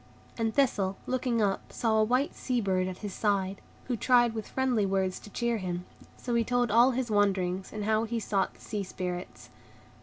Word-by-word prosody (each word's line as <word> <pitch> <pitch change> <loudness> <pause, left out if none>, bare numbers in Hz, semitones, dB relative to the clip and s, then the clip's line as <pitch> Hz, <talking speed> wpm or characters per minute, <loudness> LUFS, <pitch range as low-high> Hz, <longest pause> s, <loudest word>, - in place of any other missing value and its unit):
And 225 -1 0
Thistle, 205 -8 +1
looking 245 -3 0
up, 195 -1 -1
saw 220 -2 +1
a - - +5
white 250 +6 +1
sea 250 -2 -1
bird 185 -3 +1
at 185 -1 -5
his 200 - -4
side, 195 -2 0 0.2
who 250 - -2
tried 240 0 +4
with 220 -1 -5
friendly 255 -5 +1
words 190 -1 0
to - - -12
cheer 235 +2 -1
him. 180 -1 -4 0.3
So 245 - -4
he 235 0 +3
told 245 -1 +1
all 235 +4 +6
his 255 -2 -2
wanderings, 190 -2 +1
and 215 -1 -4
how 220 +1 +2
he 230 +1 -2
sought 200 -2 -1
the - - -20
Sea 210 -2 -3
Spirits. 180 -1 -6
215 Hz, 195 wpm, -29 LUFS, 195-240 Hz, 0.3 s, all